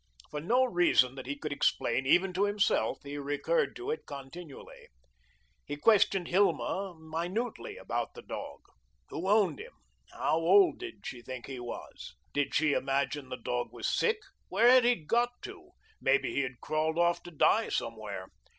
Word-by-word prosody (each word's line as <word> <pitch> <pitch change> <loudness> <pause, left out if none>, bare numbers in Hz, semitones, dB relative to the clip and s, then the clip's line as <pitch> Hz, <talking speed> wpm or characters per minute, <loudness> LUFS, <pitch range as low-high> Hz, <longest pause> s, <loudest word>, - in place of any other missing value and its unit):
For 150 - -3
no 245 +10 +3
reason 175 - +3
that 130 -1 -9
he 140 +1 -3
could 150 0 -4
explain 130 -2 +1
even 180 +5 +4
to 195 +3 +2
himself, 205 - +1
he 145 +1 -6
recurred 145 - 0
to 370 +4 -4
it 465 - -5
continually. 140 +2 -10 0.8
He 145 - -5
questioned 195 0 +4
Hilma 195 0 +1
minutely 175 +9 -4
all - - -11
about - - -3
the - - -10
dog. - - -7 0.5
Who 180 +4 -3
owned 210 - +3
him? 475 +4 -10 0.4
How - - 0
old 395 -3 +5
did 365 -1 -9
she 125 - -6
think 125 0 -7
he 135 -2 -7
was? 120 - -8 0.2
Did 145 -1 0
she 155 -1 +3
imagine 135 0 -1
the 130 - -5
dog 120 0 -3
was - - -4
sick? 455 -1 +2 0.3
Where 225 +6 +5
had 255 -1 +6
he 245 0 +5
got 240 +9 0
to? 375 -2 -10 0.3
Maybe 410 - +2
he - - +1
had 130 -2 -5
crawled 155 +1 -1
off 170 0 +2
to 175 - -10
die 160 - +3
somewhere. - - -4
170 Hz, 170 wpm, -30 LUFS, 140-225 Hz, 0.8 s, had